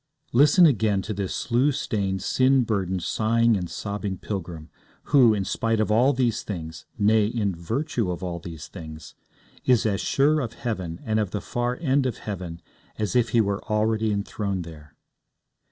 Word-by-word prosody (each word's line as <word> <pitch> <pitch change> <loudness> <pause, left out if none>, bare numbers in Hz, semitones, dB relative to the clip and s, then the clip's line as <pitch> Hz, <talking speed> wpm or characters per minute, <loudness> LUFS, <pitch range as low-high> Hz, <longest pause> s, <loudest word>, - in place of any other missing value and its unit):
Listen 145 +8 +6
again 110 - +2
to 110 - -4
this 100 -2 -3
slough 125 +4 +1
stained, 95 -8 -2
sin 130 +3 +3
burdened, 95 -5 -1
sighing 115 +3 +2
and 90 -3 -3
sobbing 100 -2 -4
pilgrim, 85 -5 -6 0.4
who, 120 -6 +6
in 100 -2 -2
spite 115 +2 0
of 110 0 +1
all 120 +6 +4
these 120 -4 0
things 80 -7 -7
nay, 105 0 +3
in 105 -4 -1
virtue 110 - -2
of 90 0 -4
all 85 -2 -3
these 80 -2 -9
things 80 -3 -10 0.5
is 125 -3 +3
as 100 -3 0
sure 150 +3 +2
of 120 -5 -3
heaven 95 -8 -4
and 110 0 0
of 105 -3 0
the 105 - -3
far 120 +3 -2
end 140 -4 +2
of 125 - -3
heaven 90 -5 -6 0.3
as 105 +2 -2
if 120 -2 +3
he 115 +1 +4
were 100 -1 -2
already 110 0 +1
enthroned 100 -2 -2
there. 75 -2 -13
105 Hz, 170 wpm, -25 LUFS, 95-120 Hz, 0.5 s, Listen